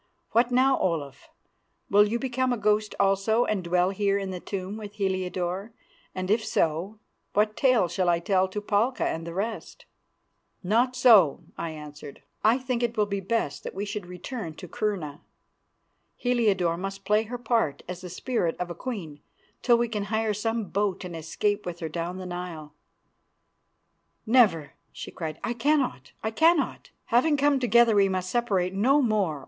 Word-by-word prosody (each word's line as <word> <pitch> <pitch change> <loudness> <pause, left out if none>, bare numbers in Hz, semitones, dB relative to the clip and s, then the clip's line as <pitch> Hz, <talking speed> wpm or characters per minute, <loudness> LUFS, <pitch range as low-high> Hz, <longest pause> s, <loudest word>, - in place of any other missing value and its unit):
What 235 +2 +3
now, 260 +2 +3
Olaf? 145 -6 -3 0.6
Will 205 +1 +5
you 225 +3 -1
become 255 0 -1
a 245 - 0
ghost 210 0 +1
also 200 +4 +2
and 200 -4 -1
dwell 180 +2 +2
here 200 0 +1
in 195 -1 -3
the 180 - -5
tomb 190 +2 -5
with 210 -1 -8
Heliodore; 185 +1 -2 0.4
and 185 +1 -2
if 220 +1 +2
so, 170 +4 -1 0.4
what 210 +1 +2
tale 255 -8 +3
shall 175 +1 0
I 170 - +4
tell 185 +2 +1
to 205 +2 -5
Palka 210 +5 +1
and 165 +1 -4
the 170 - -6
rest?" 215 +4 -4 0.8
"Not 235 +7 +2
so," 220 - +5
I 170 - -4
answered. 150 -2 -10 0.2
"I 225 +3 +5
think 255 -2 -2
it 235 -1 -1
will 210 - +3
be 200 -1 -3
best 195 -6 -2
that - - -7
we 200 +2 -3
should 205 -2 -5
return 180 - -6
to 180 - -9
Kurna. 180 -8 -3 0.9
Heliodore 205 -9 +1
must 195 +1 -6
play 210 +2 +3
her 245 +3 -5
part 225 - 0
as 180 0 -6
the 180 - -7
spirit 180 -3 -1
of 180 -1 -3
a - - -3
queen 170 - -6 0.4
till 240 -1 +4
we 235 0 +1
can 210 -3 -3
hire 220 +1 0
some 225 +2 -1
boat 195 -2 -1
and 175 -2 -7
escape 205 +6 -1
with 175 -1 -6
her 165 -3 -4
down 170 +3 -4
the 185 - -7
Nile." 175 -4 -6 1.5
"Never," 215 - +3 0.2
she - - -8
cried, 160 -3 -5
"I 240 - -1
cannot, 250 - 0
I 220 - -1
cannot. 320 +5 +2 0.2
Having 290 +5 +4
come 285 0 +3
together 235 -1 +4
we 200 -1 +4
must 185 -1 -2
separate 195 -7 0
no 255 +9 +3
more. 200 - +1
200 Hz, 175 wpm, -26 LUFS, 180-230 Hz, 1.5 s, Will